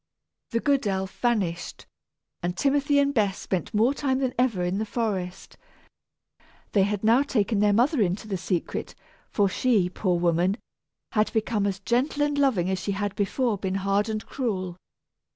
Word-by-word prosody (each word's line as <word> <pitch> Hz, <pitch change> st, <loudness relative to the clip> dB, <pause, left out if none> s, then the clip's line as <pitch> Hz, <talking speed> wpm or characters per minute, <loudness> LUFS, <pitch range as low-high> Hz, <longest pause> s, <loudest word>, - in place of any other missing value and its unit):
The 230 Hz, -, 0 dB
good 275 Hz, -3 st, +1 dB
elf 190 Hz, -1 st, -2 dB
vanished, 200 Hz, -8 st, -1 dB, 0.6 s
and 175 Hz, +1 st, -2 dB
Timothy 285 Hz, +1 st, +2 dB
and 280 Hz, 0 st, +3 dB
Bess 205 Hz, -6 st, +1 dB
spent 185 Hz, -2 st, -3 dB
more 225 Hz, +5 st, +3 dB
time 270 Hz, -2 st, 0 dB
than 260 Hz, -2 st, -1 dB
ever 235 Hz, -8 st, +1 dB
in 180 Hz, +3 st, -1 dB
the 220 Hz, -, -1 dB
forest. 195 Hz, -6 st, -3 dB, 1.1 s
They 200 Hz, -, +3 dB
had 205 Hz, +1 st, 0 dB
now 230 Hz, +4 st, +5 dB
taken 220 Hz, -6 st, 0 dB
their 205 Hz, 0 st, +4 dB
mother 245 Hz, +6 st, +3 dB
into 195 Hz, +2 st, 0 dB
the 200 Hz, -, -2 dB
secret, 180 Hz, -1 st, -3 dB, 0.3 s
for 205 Hz, -2 st, +2 dB
she, 200 Hz, -2 st, +2 dB
poor 180 Hz, -2 st, 0 dB
woman, 175 Hz, +3 st, +2 dB, 0.5 s
had 215 Hz, -1 st, +1 dB
become 220 Hz, -2 st, 0 dB
as 195 Hz, -2 st, -1 dB
gentle 255 Hz, +8 st, 0 dB
and 290 Hz, 0 st, 0 dB
loving 260 Hz, -11 st, +2 dB
as 190 Hz, 0 st, -1 dB
she 200 Hz, +3 st, -2 dB
had 205 Hz, 0 st, -2 dB
before 210 Hz, +1 st, 0 dB
been 190 Hz, 0 st, -2 dB
hard 195 Hz, +2 st, +1 dB
and 215 Hz, 0 st, -3 dB
cruel. 190 Hz, -9 st, -3 dB
210 Hz, 170 wpm, -26 LUFS, 190-245 Hz, 1.1 s, now